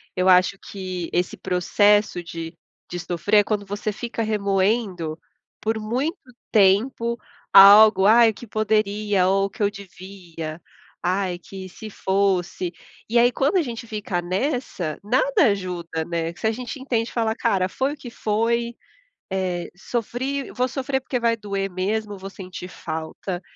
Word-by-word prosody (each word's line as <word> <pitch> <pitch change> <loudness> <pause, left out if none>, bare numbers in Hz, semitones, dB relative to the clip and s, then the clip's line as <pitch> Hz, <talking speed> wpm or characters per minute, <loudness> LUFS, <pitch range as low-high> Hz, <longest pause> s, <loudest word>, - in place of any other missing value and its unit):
Eu 185 0 +1
acho 185 +1 +5
que 185 -3 -6
esse 180 +1 0
processo 205 +1 +2
de 165 0 -7 0.4
de 175 - -4
sofrer 180 +5 +2
é 205 - +4
quando 210 -1 -2
você 205 +2 -3
fica 230 +2 -5
remoendo 195 -5 0 0.4
por 220 +1 0
muito 260 - -2 0.4
tempo 230 +4 +3 0.4
algo. 200 0 +9
"Ai, 230 +2 +7
o - - -2
que 240 - -11
poderia?" 210 -2 +1
Ou 195 +1 +3
"O - - -3
que 215 +1 -11
eu 205 - +3
devia? 180 -5 -9 0.4
Ai, 185 0 0
que 190 +1 -9
se 215 +4 -9
fosse" 190 -3 0 0.4
E 235 +1 +4
aí, 240 +1 +6
quando 285 +10 +1
a - - +4
gente 235 -4 -5
fica 210 -5 -3
nessa, 185 - -2
nada 450 - +3
ajuda, 175 -4 -4
né? 170 -1 -2
Se 220 - -2
a - - +3
gente 250 +4 -6
entende 240 -3 -1
e - - -14
fala: 225 -1 0
"Cara, 185 -2 +1
foi 265 +8 -1
o - - -10
que 245 - -9
foi, 235 +2 0 0.6
eh, 185 -2 -2
sofri, 245 +6 -3
vou 250 0 0
sofrer 265 +1 -2
porque 250 -2 -2
vai 230 -1 +2
doer 200 -2 -3
mesmo, 205 +3 -2
vou 195 +1 -8
sentir 185 -2 -8
falta, 165 +3 -5
200 Hz, 160 wpm, -23 LUFS, 185-230 Hz, 0.6 s, algo